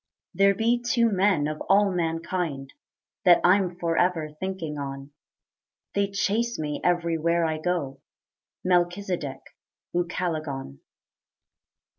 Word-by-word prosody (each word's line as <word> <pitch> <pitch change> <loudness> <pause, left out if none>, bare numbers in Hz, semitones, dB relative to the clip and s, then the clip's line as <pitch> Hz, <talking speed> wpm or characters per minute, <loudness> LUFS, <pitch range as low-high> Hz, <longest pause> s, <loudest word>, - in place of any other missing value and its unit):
There 195 0 +4
be 235 +3 +1
two 235 -1 +2
men 190 -6 +2
of 155 0 -5
all 200 0 +5
mankind 165 -4 -2 0.5
That 180 -3 +7
I'm 180 -1 +3
forever 170 -2 +1
thinking 170 -6 -4
on: 135 0 -6 0.8
They 200 0 +1
chase 215 +4 0
me 150 -2 -3
everywhere 170 -1 +1
I 160 -1 -1
go, 155 -6 -2 0.6
Melchizedek, 175 -5 0 0.5
Ucalegon. 160 - -3
175 Hz, 100 wpm, -26 LUFS, 155-190 Hz, 0.8 s, That